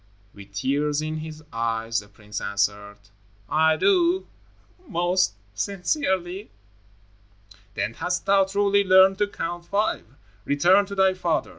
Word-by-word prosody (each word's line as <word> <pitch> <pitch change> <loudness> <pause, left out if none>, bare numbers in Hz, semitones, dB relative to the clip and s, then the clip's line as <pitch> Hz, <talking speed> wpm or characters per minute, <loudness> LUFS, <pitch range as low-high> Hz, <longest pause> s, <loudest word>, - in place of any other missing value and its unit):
With 100 -1 -14
tears 145 +6 0
in 155 0 -3
his 155 0 -8
eyes, 115 0 -1
the 105 - -12
prince 105 0 -8
answered, 100 0 -2 0.5
"I 160 +3 +3
do, 365 - +2 0.6
most 175 - +1 0.2
sincerely." 190 - -2 1.3
"Then 100 +3 -2
hast 180 +8 -3
thou 195 -1 +4
truly 200 +1 +2
learned 190 0 +5
to 205 - +2
Count 175 -3 -5
Five. 205 - -1 0.4
Return 180 - +3
to 200 - -7
thy 190 -1 +4
father. 175 -3 -1
175 Hz, 125 wpm, -24 LUFS, 115-195 Hz, 1.3 s, learned